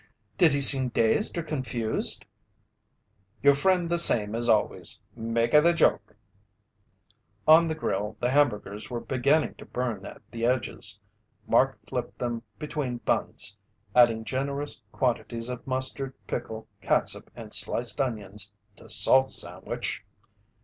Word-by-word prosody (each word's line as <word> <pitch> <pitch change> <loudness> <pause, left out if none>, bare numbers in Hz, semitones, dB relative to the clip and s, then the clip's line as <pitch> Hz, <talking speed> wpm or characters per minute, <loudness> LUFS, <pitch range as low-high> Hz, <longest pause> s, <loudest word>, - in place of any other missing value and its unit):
"Did 165 -3 +4
he 140 - +1
seem 135 -2 +5
dazed 115 - +1
or 170 - -1
confused?" 130 -7 -1 1.2
"Your 140 0 +7
friend 180 +4 +1
the 170 0 0
same 105 -10 +3
as 120 +1 +2
always. 105 -2 +2
Make 115 0 -1
a 150 - +8
the 170 +2 +4
joke." 105 -9 +1 1.3
On 160 +2 +7
the 160 - -2
grill, 105 -7 -3
the 125 +1 0
hamburgers 105 -7 0
were 120 -2 -3
beginning 140 +5 +1
to - - -10
burn 120 -6 -3
at - - -12
the 115 0 -6
edges. 120 -5 0 0.5
Mark - - +2
flipped - - -5
them 120 -2 -3 0.2
between 150 -5 -4
buns, - - -2 0.4
adding 115 -2 +5
generous 140 +2 -3
quantities 120 -2 -2
of 125 0 -7
mustard, 130 +1 -1
pickle, 110 0 -5
catsup, - - +1
and - - -9
sliced 120 +4 -1
onions 105 -5 -4 0.3
to - - -14
Salt's 130 0 +5
sandwich. - - -5
125 Hz, 135 wpm, -27 LUFS, 115-140 Hz, 1.3 s, a